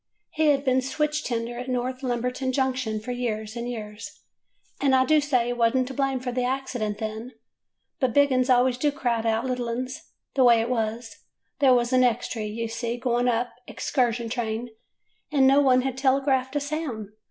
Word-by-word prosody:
He 315 0 +1
had 285 -1 +3
been 260 0 +3
switch 300 +3 -1
tender 235 0 -3
at 250 - -6
North 255 +1 -2
Lumberton 250 +1 -1
Junction 255 -4 -1
for 225 +4 -6
years 220 -3 -3
and 240 0 -4
years, 210 -2 -8 0.6
and 270 -2 +4
I 260 0 +4
do 310 +1 +4
say 260 -5 +1
he 245 - -1
was 235 +1 +2
n't 255 -1 +1
to - - -6
blame 270 0 0
for 250 0 -4
the 250 +1 -1
accident 245 -5 -2
then; 220 +3 -5 0.7
but 260 -3 +1
big 285 +2 +4
'uns 255 0 +1
always 250 0 +3
do 295 +2 +2
crowd 240 -6 -1
out 225 +2 +1
little 250 -2 -2
'uns. 255 +5 -4 0.3
The 265 - +3
way 235 -2 +6
it 230 +2 -1
was 225 0 -2 0.2
— - - -51
there 265 -3 +6
was 240 +1 +1
an 255 0 +5
extry, 235 -2 0
you 230 +2 -3
see, 230 +1 -3
going 245 0 0
up, 240 0 0 0.2
a - - -9
'xcursion 235 -3 0
train, 230 -1 -3 0.6
and 275 -3 +4
no 275 +2 +6
one 255 -2 +4
had 265 -1 -3
telegraphed 265 0 +1
a - - +3
sound. 285 -8 -4
250 Hz, 200 wpm, -25 LUFS, 235-265 Hz, 0.7 s, way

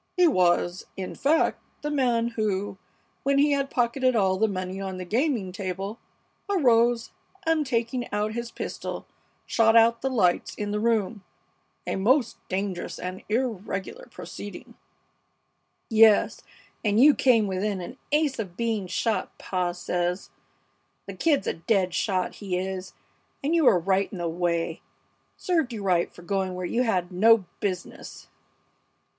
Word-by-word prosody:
He 360 -1 +6
was, 180 - +2
in 190 -1 -5
fact, 305 +4 +1 0.2
the 295 - -2
man 240 -5 +1
who, 205 -4 -2 0.4
when 275 +1 +1
he 290 +1 +4
had 275 -1 0
pocketed 255 +1 +1
all 190 -3 +3
the 220 +3 +3
money 185 -1 -4
on 190 -1 -4
the 185 - -5
gaming 230 - 0
table, 195 +3 -5 0.5
arose 240 - +3 0.3
and, 320 -3 +1
taking 240 0 -1
out 210 +1 -1
his 235 0 -4
pistol, - - -6 0.4
shot 225 -1 +3
out 230 0 +5
the 265 - 0
lights 185 -9 +1
in 205 -1 -3
the 210 - -1
room, 215 -2 0 0.6
a - - -2
most 235 +5 +2
dangerous 190 -1 -3
and 185 +1 -6
irregular 225 - -3
proceeding 205 - -9 0.6
" - - -48 0.4
"Yes, 220 -1 +5 0.4
and 210 -1 +2
you 290 +4 +8
came 235 -6 +4
within 195 +1 -1
an 240 +9 -8
ace 295 -4 +1
of 190 -5 -5
being 225 -5 -1
shot, 225 +4 -1
pa 180 -2 -1
says. 175 +1 -2 0.7
The - - -7
Kid's 305 -4 +1
a - - 0
dead 185 0 0
shot, 185 -2 0
he 190 -3 -2
is, 185 0 -4 0.5
and 295 +4 +1
you 330 -3 +3
were 190 - +6
right 190 +3 +1
in 195 - -6
the 175 -1 -2
way. 170 0 -1 0.6
Served 325 -8 0
you 215 -3 -5
right 180 -3 +1
for 175 - -14
going 190 0 -1
where 180 0 -4
you 235 +7 0
had 185 -7 0
no 215 +2 +5
business!" 185 -3 -5
210 Hz, 150 wpm, -26 LUFS, 185-240 Hz, 0.7 s, you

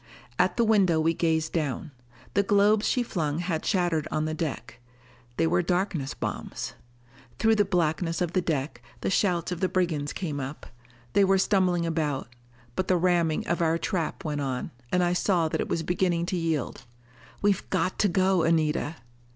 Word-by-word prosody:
At 180 0 +2
the 235 - +4
window 195 -7 +4
we 165 +1 +2
gazed 160 -1 0
down. 150 -2 -2 0.4
The 200 - +4
globes 205 +2 +3
she 250 - +2
flung 155 -9 -2
had 170 -2 -2
shattered 175 -6 +1
on 155 0 -1
the 155 - -2
deck. 155 -6 -4 0.6
They 165 - +3
were 175 +2 +2
darkness 175 -5 -1
bombs. - - -4 0.6
Through 225 0 +4
the 205 - +4
blackness 165 -3 0
of 175 -1 -1
the 185 - +2
deck, 140 -7 -2 0.2
the - - -1
shouts 180 -3 +1
of 180 - -3
the 185 - +1
brigands 160 -6 0
came 155 -6 -4
up. 135 +2 -6 0.5
They 200 - +5
were 195 0 +4
stumbling 185 -3 +2
about. 155 -6 -1 0.5
But 185 - -1
the 185 - +3
ramming 170 -3 +1
of 175 - -1
our 165 0 +2
trap 170 -3 -3
went 150 -2 -2
on, 130 -2 -3 0.2
and 180 0 +3
I 175 0 +2
saw 175 -2 +2
that - - -1
it - - -4
was 165 - -1
beginning 175 0 0
to - - +2
yield. 160 -6 -2 0.6
"We've 205 -1 +1
got 185 0 0
to 210 - +4
go, 185 0 +2
Anita!" 160 -1 +1
170 Hz, 180 wpm, -27 LUFS, 155-185 Hz, 0.6 s, They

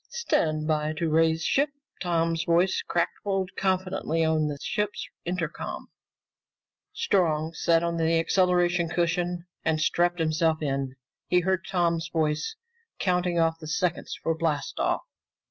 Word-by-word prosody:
"Stand 155 - 0
by 155 -1 +1
to 165 +1 -1
raise 160 0 +3
ship!" 285 +2 +2 0.3
Tom's 165 -2 +1
voice 175 +2 +3
crackled 190 +2 -1
confidently 185 -3 0
over 160 0 +2
the 145 -1 -3
ship's 210 +6 -2 0.2
intercom. 170 -2 -4 1.0
Strong 160 -4 +1
sat 165 0 +2
on 170 0 -1
an 160 - +2
acceleration 175 +1 +2
cushion 175 0 0 0.2
and 160 -1 +1
strapped 175 +2 +2
himself 160 0 +1
in. 135 -3 -2 0.3
He 180 - +3
heard 190 +1 0
Tom's 170 -3 +1
voice 155 - 0 0.4
counting 180 -2 +1
off 165 0 +2
the 155 - -8
seconds 170 +2 -1
for 165 - +2
blast 155 -3 -2
off. - - +1
170 Hz, 130 wpm, -27 LUFS, 160-180 Hz, 1.0 s, raise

